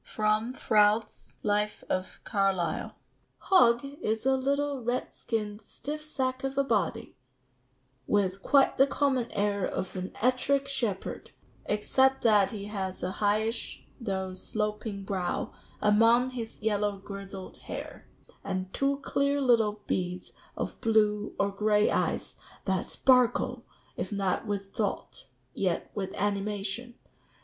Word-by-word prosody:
[Sidenote: 215 +3 0
Froude's 210 +1 +2
Life 210 0 0
of 185 0 -3
Carlyle.] 195 -5 0 0.4
"Hogg 240 -9 +4 0.2
is 220 +2 -1
a 265 0 +4
little 280 +1 0
red 245 +2 -1
skinned 210 -2 -3
stiff 295 +8 -6
sack 260 -4 -2
of 270 0 -3
a 275 - +4
body, 210 -9 -1 0.9
with 195 -2 +1
quite 275 +3 +4
the 270 - +7
common 270 -4 +1
air 200 -1 0
of 185 +1 -3
an 185 0 -4
Ettrick 260 +3 +2
shepherd, 230 -8 -3 0.4
except 265 +6 +2
that 210 -4 +5
he 205 -3 -6
has 195 -3 -4
a 180 - -1
highish 215 +2 0 0.2
though 190 -5 -2
sloping 210 +1 -3
brow 190 -3 -2 0.3
(among 230 +4 +5
his 230 -3 -6
yellow 205 -2 +1
grizzled 195 -1 -8
hair), - - -8 0.3
and 185 0 -3
two 275 0 0
clear 280 +1 +1
little 225 -5 +3
beads 180 0 -2 0.2
of - - -4
blue 210 -2 +2
or 200 0 +1
gray 210 +1 +3
eyes - - 0 0.3
that 190 -2 0
sparkle, 250 -1 +3 0.3
if 185 - -4
not 195 +1 -1
with 200 -1 -3
thought, 205 -9 -3 0.3
yet 180 -3 -1
with 195 -2 -3
animation. 205 +3 -2
210 Hz, 125 wpm, -29 LUFS, 200-250 Hz, 0.9 s, the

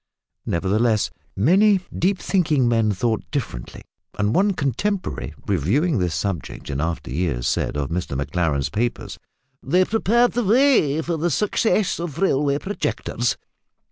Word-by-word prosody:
Nevertheless, 105 +5 +1 0.2
many 190 - +4 0.2
deep 190 +3 +1
thinking 155 -11 +1
men 115 -2 +2
thought 110 +3 0
differently, - - -5 0.3
and 105 +2 +1
one 200 +5 +3
contemporary, 180 - -2
reviewing 105 - +1
this 90 -3 -1
subject 95 -6 -4
in 70 +1 -2
after 80 -5 -3
years, 75 -5 -1
said 65 - -1
of 75 +1 -3
Mr 85 -5 -2
Maclaren's 70 -1 -1
papers, 120 +2 -3 0.4
that, - - -12
"they 185 +4 +4
prepared 230 +3 +2
the 245 - -1
way 210 - +3
for 170 0 -2
the 170 +3 0
success 210 +3 +1
of 170 -3 -5
railway 145 -6 +2
projectors." 200 +7 -2
135 Hz, 140 wpm, -22 LUFS, -, 0.4 s, many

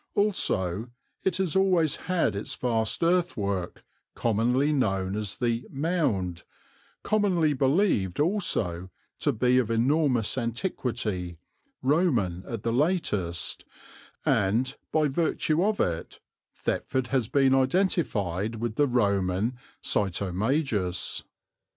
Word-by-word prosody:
Also 115 - +1 0.3
it 190 -2 +1
has 190 -4 -1
always 180 -6 +3
had 175 - +1
its 100 - -4
vast 115 +2 0
earthwork, 105 - 0 0.3
commonly 120 +6 +1
known 95 -8 0
as 105 -2 -2
the 120 -1 -1
"mound," 135 - -1 0.6
commonly 185 -8 +2
believed 135 - +1
also 110 - 0 0.3
to - - +2
be 125 0 +3
of 120 -4 -1
enormous 125 0 +2
antiquity, 115 - -3 0.5
Roman 125 - +1
at 115 -2 -5
the 115 - 0
latest, 120 - 0 0.6
and 120 +8 +1 0.2
by 155 -1 +3
virtue 155 +2 +1
of 210 +1 +1
it 85 -2 -2 0.4
Thetford 130 -2 -2
has 130 -5 +1
been 135 +1 +3
identified 125 - +1
with 115 0 -4
the 145 - +4
Roman 100 -2 +1 0.3
Sitomagus. 100 - -1
120 Hz, 105 wpm, -27 LUFS, 100-155 Hz, 0.6 s, the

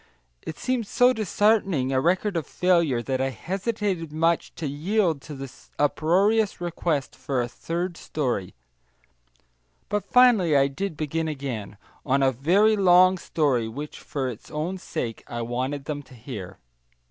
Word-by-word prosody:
It 155 - -7
seemed 250 -4 -1
so 245 +4 +4
disheartening 205 - +1
a 130 - +2
record 185 +5 +1
of 165 -4 -2
failure 170 -9 +2
that 130 0 -1
I 135 - +1
hesitated 190 - -3
much 165 +2 +1
to 160 - -5
yield 160 +2 0
to 150 - -9
the 135 -2 -8 0.2
uproarious 195 +9 +2
request 170 -4 -2
for 135 -2 -2
a 120 - 0
third 170 +7 -4
story, 125 - -3 1.3
but 210 -1 0
finally 225 - +5
I 135 0 +3
did 175 +3 -4
begin 160 +1 -2
again, 130 -9 -5 0.3
on 135 0 +2
a 135 - +4
very 185 - +3
long 185 -1 +5
story 140 -10 0
which 145 +7 -7
for 135 -3 -3
its 120 -3 -8
own 170 +5 -3
sake 115 -9 -5
I 120 0 -4
wanted 130 +4 -3
them 145 0 -4
to 130 -2 -16
hear. 105 -6 -8
155 Hz, 150 wpm, -25 LUFS, 135-185 Hz, 1.3 s, finally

